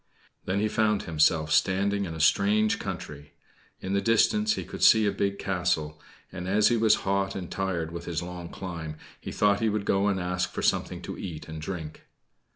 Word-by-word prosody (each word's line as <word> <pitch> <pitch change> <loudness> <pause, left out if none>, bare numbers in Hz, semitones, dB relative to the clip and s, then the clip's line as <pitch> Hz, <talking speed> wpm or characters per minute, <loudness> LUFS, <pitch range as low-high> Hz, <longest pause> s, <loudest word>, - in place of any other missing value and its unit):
Then 95 +2 0
he 105 - +1
found 105 -1 +1
himself 80 -1 +2
standing 100 +2 +2
in 80 -3 -6
a - - -7
strange 105 +6 +3
country. 75 0 -7 0.5
In 95 - -3
the 100 - +2
distance 210 - +3
he - - -4
could - - -6
see 110 -1 +7
a 100 - +2
big 100 0 -1
castle; 85 -5 -1 0.3
and, 90 - -6
as 105 +2 +4
he 120 - +2
was 110 -1 +4
hot 100 0 0
and 90 -3 -6
tired 90 -4 -2
with 85 0 -7
his 85 0 -3
long 90 -1 -7
climb, 80 -4 -6 0.2
he - - -7
thought 100 -1 +2
he 115 - +1
would 105 -1 -2
go 100 +1 +2
and 100 -2 +1
ask 90 0 -1
for - - -5
something - - 0
to - - -7
eat 85 -5 -7
and 80 -1 -7
drink. 80 -3 -7
95 Hz, 200 wpm, -27 LUFS, 85-100 Hz, 0.5 s, see